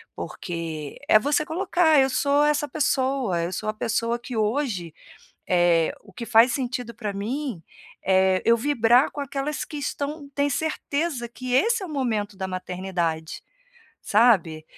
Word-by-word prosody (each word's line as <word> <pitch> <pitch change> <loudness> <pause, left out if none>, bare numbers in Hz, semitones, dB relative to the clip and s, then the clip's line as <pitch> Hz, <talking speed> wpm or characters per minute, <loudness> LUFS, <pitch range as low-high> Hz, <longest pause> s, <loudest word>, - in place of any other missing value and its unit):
porque 165 -4 -6
é 215 - +7
você 290 +5 +1
colocar: 330 -3 +2
"Eu 265 0 +4
sou 285 +3 +2
essa 295 0 +1
pessoa, 265 - 0
eu 175 +2 -3
sou 215 +4 -3
a - - -1
pessoa 230 +2 -1
que 245 0 -7
hoje, 215 - -1 0.6
eh, 175 -2 +3
o 200 - -18
que 235 - -6
faz 235 +1 +5
sentido 245 -3 -3
pra 210 -3 -4
mim 225 - -4 0.4
é 190 -1 +3
eu 235 0 +5
vibrar 245 0 +3
com 290 - -6
aquelas 280 +1 -3
que 300 - -9
estão 285 +1 -4
tem 285 0 +1
certeza 290 -2 -2
que 250 +1 -6
esse 445 - +3
é - - -4
o - - -11
momento 215 -7 -2
da 190 -1 -4
maternidade", 180 -3 -3 0.6
sabe. 190 -9 +3
235 Hz, 155 wpm, -24 LUFS, 190-285 Hz, 0.6 s, é